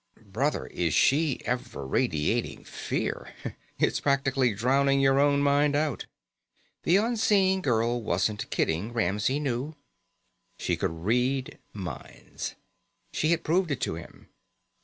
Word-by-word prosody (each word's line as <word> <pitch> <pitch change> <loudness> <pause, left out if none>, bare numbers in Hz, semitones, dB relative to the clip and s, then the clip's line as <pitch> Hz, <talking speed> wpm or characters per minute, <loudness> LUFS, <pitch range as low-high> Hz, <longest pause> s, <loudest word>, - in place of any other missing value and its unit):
Brother, 125 +10 -1
is 85 -4 -1
she 145 -1 +3
ever 120 - -3
radiating 75 +3 0
fear! - - -4 0.4
It's - - +1
practically 135 -2 +2
drowning 135 +5 +3
your 135 0 +4
own 140 0 +3
mind 145 +1 +3
out." 150 0 -1 0.7
The 175 - +3
unseen 205 -4 +2
girl 120 -4 +1
wasn't 105 +1 -1
kidding, 90 +9 -1
Ramsey 105 +5 +1
knew. 140 +2 -2 0.8
She - - 0
could 80 +1 -3
read 125 +4 0
minds. 95 -3 -7 0.6
She 155 - +1
had 170 0 +2
proved 175 +2 +1
it 140 -4 -2
to - - -1
him. 85 0 -11
135 Hz, 120 wpm, -27 LUFS, 110-145 Hz, 0.8 s, your